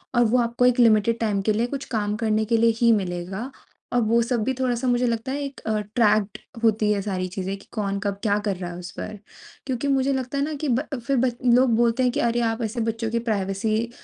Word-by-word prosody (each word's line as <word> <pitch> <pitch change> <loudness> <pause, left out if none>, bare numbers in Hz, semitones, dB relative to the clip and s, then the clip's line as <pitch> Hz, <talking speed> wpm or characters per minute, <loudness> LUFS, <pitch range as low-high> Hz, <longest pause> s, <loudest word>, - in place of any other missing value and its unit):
और 240 - +5
वो 230 +3 +3
आपको 235 +1 +1
एक 250 0 +3
लिमिटेड 230 0 +4
टाइम 210 -3 0
के 215 +2 +1
लिए 230 +3 +1
कुछ 270 - -9
काम 210 -1 0
करने 220 -1 +1
के 230 +1 +2
लिए 230 0 +4
ही 235 -1 +6
मिलेगा। 190 +5 -3 0.4
और 245 - +3
वो 230 +2 +3
सब 235 -1 0
भी 260 +3 0
थोड़ा-सा 255 -1 -1
मुझे 245 0 +2
लगता 230 +2 -2
है 285 +1 -2
एक 275 0 -7 0.3
ट्रैक्ड 215 -2 +2 0.3
होती 215 -1 +3
है 200 - -1
सारी 185 -2 -2
चीज़ें, 190 +1 -4
कि - - -18
कौन 200 -3 -2
कब 200 -1 -2
क्या 205 -1 +2
कर 195 - 0
रहा 175 -1 -5
है 175 - -8
उस 180 0 -8
पर। 215 - -7 0.5
क्यूँकि 260 +1 -2
मुझे 270 0 +2
लगता 265 +1 -3
है 280 - +1
ना 310 +1 -2
कि 290 - 0
ब 255 +5 +1 0.2
फिर 270 -3 +2 0.3
लोग 250 -2 +4
बोलते 235 +2 +2
हैं 250 - +3
कि, - - -2
"अरे! 235 0 +1
आप 225 +1 -1
ऐसे 225 +2 -3
बच्चों 225 0 -2
की 235 - +1
प्राइवेसी 215 +3 -1
230 Hz, 240 wpm, -24 LUFS, 210-245 Hz, 0.5 s, ही